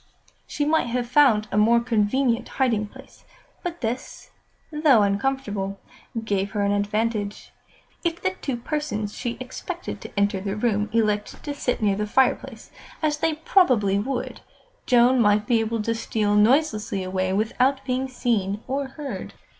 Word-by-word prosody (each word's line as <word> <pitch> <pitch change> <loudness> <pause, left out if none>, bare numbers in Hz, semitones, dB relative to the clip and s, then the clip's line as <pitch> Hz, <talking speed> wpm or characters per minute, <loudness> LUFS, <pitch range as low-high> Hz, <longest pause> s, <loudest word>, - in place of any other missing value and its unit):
She 290 - -1
might 315 -3 +2
have 240 0 -2
found 245 -5 +4
a 200 - -1
more 230 +3 +5
convenient 235 +2 +1
hiding 230 -6 +1
place, 265 +5 -16 0.4
but 345 -1 -5
this, 235 +2 -5 0.4
though 300 -8 +4
uncomfortable, 200 -2 -1 0.5
gave 200 -1 -1
her 205 -2 0
an 200 - +2
advantage. 205 +1 -1 0.5
If 340 -1 -1
the 185 - 0
two 245 +6 -4
persons 235 -6 -3
she 240 -2 -4
expected 255 0 -6
to - - -5
enter 200 -1 +1
the 195 0 -3
room 210 -2 0
elected 210 -2 0
to 290 - -3
sit 250 -5 -2
near 200 -2 +3
the 210 0 -2
fireplace, 265 +5 0 0.3
as 300 -1 +1
they 320 +1 0
probably 255 - +3
would, 250 +4 -4 0.5
Joan 245 0 +5
might 210 -1 +3
be 230 +1 +3
able 225 0 -1
to 230 - 0
steal 220 -2 -1
noiselessly 215 -3 +2
away 185 0 -1
without 255 +6 +1
being 260 0 -1
seen 220 -5 -1
or 275 +1 -2
heard. 280 +1 -7
230 Hz, 155 wpm, -24 LUFS, 205-265 Hz, 0.5 s, more